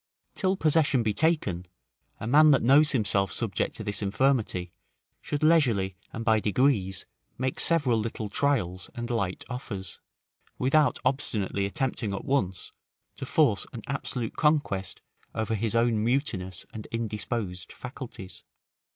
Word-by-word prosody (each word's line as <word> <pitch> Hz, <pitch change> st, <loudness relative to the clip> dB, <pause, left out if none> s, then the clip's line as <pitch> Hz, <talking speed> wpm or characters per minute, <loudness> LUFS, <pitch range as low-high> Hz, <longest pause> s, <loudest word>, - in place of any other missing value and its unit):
Till 190 Hz, -1 st, +1 dB
possession 150 Hz, -6 st, +3 dB
be 110 Hz, -1 st, +1 dB
taken, 100 Hz, -, +1 dB, 0.5 s
a -, -, -5 dB
man 150 Hz, +6 st, +6 dB
that 140 Hz, -, +4 dB
knows 145 Hz, +5 st, +6 dB
himself 100 Hz, -, +1 dB
subject 110 Hz, +1 st, -1 dB
to 110 Hz, -, -5 dB
this 105 Hz, 0 st, -3 dB
infirmity, 100 Hz, -5 st, 0 dB, 0.5 s
should 145 Hz, +1 st, -3 dB
leisurely 120 Hz, -, +3 dB, 0.2 s
and 115 Hz, -, -5 dB
by 110 Hz, -2 st, +4 dB
degrees 105 Hz, -4 st, +1 dB, 0.3 s
make 130 Hz, +1 st, -2 dB
several 140 Hz, -9 st, +2 dB
little 110 Hz, 0 st, -3 dB
trials 100 Hz, -8 st, 0 dB
and 120 Hz, 0 st, -4 dB
light 100 Hz, -6 st, -1 dB
offers, 105 Hz, -8 st, -6 dB, 0.6 s
without 145 Hz, +3 st, +3 dB
obstinately 105 Hz, -7 st, 0 dB
attempting 115 Hz, -1 st, -2 dB
at -, -, -6 dB
once, 95 Hz, -10 st, -1 dB, 0.4 s
to 135 Hz, -, -6 dB
Force 140 Hz, -, +2 dB
an 115 Hz, -3 st, -7 dB
absolute 130 Hz, -3 st, -3 dB
conquest 145 Hz, -, 0 dB, 0.3 s
over 110 Hz, 0 st, -1 dB
his 110 Hz, +1 st, -1 dB
own 115 Hz, -2 st, +2 dB
mutinous 110 Hz, -, -1 dB
and 110 Hz, -1 st, -7 dB
indisposed 105 Hz, -4 st, -3 dB
faculties. 125 Hz, -7 st, -9 dB
115 Hz, 135 wpm, -27 LUFS, 100-135 Hz, 0.6 s, man